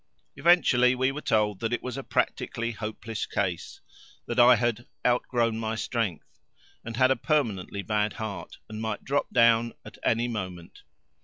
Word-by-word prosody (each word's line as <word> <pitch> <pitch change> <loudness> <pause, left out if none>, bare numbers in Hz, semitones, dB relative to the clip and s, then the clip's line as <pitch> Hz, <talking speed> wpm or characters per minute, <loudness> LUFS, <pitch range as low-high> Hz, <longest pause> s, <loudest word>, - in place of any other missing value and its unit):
Eventually 130 -8 +4
we 130 +1 +1
were 150 +2 -6
told 105 -6 +1
that 115 0 -2
it 120 - -2
was 125 -1 -4
a 135 - -4
practically 115 -2 -1
hopeless 110 0 -5
case, - - -3 0.4
that 120 +1 -2
I 120 +1 +8
had 120 +1 -1 0.2
"outgrown 120 -2 +1
my 110 0 -2
strength," 85 -11 -3 0.4
and 115 -1 -6
had 130 +1 +5
a - - +4
permanently 110 - -1
bad 105 0 0
heart 110 -3 -6
and 110 0 -7
might 110 0 -3
drop 140 +2 -1
down 115 0 +4
at - - -12
any 115 +1 +2
moment. 90 -7 -6
115 Hz, 160 wpm, -27 LUFS, 110-125 Hz, 0.4 s, I